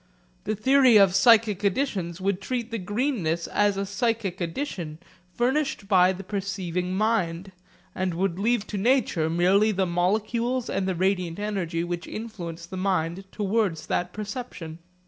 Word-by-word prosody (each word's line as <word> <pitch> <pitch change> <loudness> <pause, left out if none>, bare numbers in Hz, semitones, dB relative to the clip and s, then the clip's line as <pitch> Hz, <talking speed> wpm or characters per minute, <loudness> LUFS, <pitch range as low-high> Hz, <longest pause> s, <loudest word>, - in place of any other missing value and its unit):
The 215 - -1
theory 260 +2 +5
of 195 -3 +5
psychic 215 0 +4
additions 195 -6 -1
would 195 0 -1
treat 240 +1 -3
the 230 - -2
greenness 200 - -1
as 205 -1 +1
a 200 - -1
psychic 205 -2 -1
addition 170 - -4 0.4
furnished 260 -3 0
by 185 -2 +5
the 190 +1 -6
perceiving 185 -2 -3
mind, 195 -4 0 0.4
and 185 -2 -2
would 185 0 -1
leave 225 0 +1
to 205 - -1
nature 210 -8 +2
merely 190 +6 +3
the 190 -2 0
molecules 220 +8 0
and 190 0 -1
the 190 - 0
radiant 180 -2 0
energy 190 -5 -2
which 175 0 -4
influence 175 -7 -6
the 185 +2 -8
mind 185 -1 -1
towards 200 -6 -1
that 180 0 -1
perception. 210 -6 -6
195 Hz, 145 wpm, -25 LUFS, 175-220 Hz, 0.4 s, theory